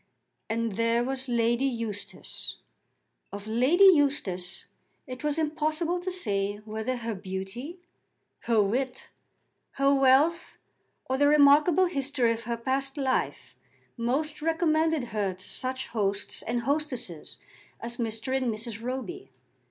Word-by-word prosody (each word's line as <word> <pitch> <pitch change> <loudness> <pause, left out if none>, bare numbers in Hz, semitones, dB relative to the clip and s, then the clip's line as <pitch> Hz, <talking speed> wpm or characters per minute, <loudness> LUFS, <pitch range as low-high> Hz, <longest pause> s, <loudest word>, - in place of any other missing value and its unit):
And 230 0 -1
there 230 +1 +2
was 265 0 -3
Lady 235 +2 +2
Eustace! 230 -5 -3 0.8
Of 200 +1 -7
Lady 255 - +3
Eustace 240 - +3 0.4
it 255 0 -8
was 300 0 0
impossible 315 +2 0
to 370 +1 -3
say 205 - 0
whether 220 +4 -3
her 230 -1 -3
beauty, 195 - -6 0.7
her 230 -2 +3
wit, 250 +6 -2 0.6
her 275 0 +3
wealth, 275 +5 +3 0.5
or 260 - -1
the 285 - +5
remarkable 300 +5 +6
history 275 -7 +1
of 230 0 -7
her 235 0 -2
past 270 +3 -1
life, 265 -2 -1 0.4
most 280 +6 -1
recommended 320 -4 +1
her 200 -3 -1
to 185 - -12
such 260 0 -3
hosts 200 -3 -1
and 240 +1 -2
hostesses 255 - -2 0.4
as 235 +1 -5
Mr. 230 +2 -2
and 255 -3 +1
Mrs. 225 0 -4
Roby. 265 +11 -5
255 Hz, 125 wpm, -28 LUFS, 225-295 Hz, 0.8 s, remarkable